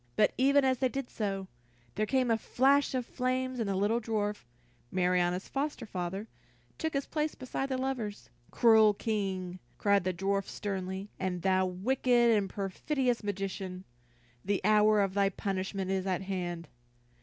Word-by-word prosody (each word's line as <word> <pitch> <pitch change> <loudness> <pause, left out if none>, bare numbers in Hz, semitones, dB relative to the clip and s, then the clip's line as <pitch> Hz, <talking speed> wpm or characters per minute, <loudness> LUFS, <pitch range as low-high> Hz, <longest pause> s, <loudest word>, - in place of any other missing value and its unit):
But 210 - +3
even 275 +1 +4
as 260 -1 +2
they 260 -1 +2
did 270 -1 -5
so, 195 -3 -3 0.5
there 215 - -1
came 255 -1 +2
a 225 - +3
flash 275 +4 +3
of 250 -2 -1
flame 255 0 -2
and 220 -3 -1
the 195 - 0
little 210 +5 +1
dwarf, 210 - -2 0.5
Marianna's 180 0 +1
foster 280 -3 -3
father, 190 +1 -4 0.5
took 320 0 -1
his 275 - 0
place 305 0 -2
beside 265 +1 -4
the 260 - -1
lovers. 250 -6 -3 0.2
"Cruel 220 -3 +5
King!" 190 -4 -2 0.2
cried 200 -2 +3
the 185 - 0
dwarf 195 +2 -1
sternly, 190 0 -4
"and 180 -2 -2
thou, 185 -1 +3
wicked 240 +5 +2
and 200 -2 0
perfidious 240 +6 -1
magician, 190 -2 -4 0.6
the 200 0 0
hour 215 0 +5
of 195 -1 0
thy 200 0 +3
punishment 190 0 -3
is 190 0 -1
at 185 0 -1
hand." 175 -3 -4
205 Hz, 155 wpm, -31 LUFS, 190-250 Hz, 0.6 s, Cruel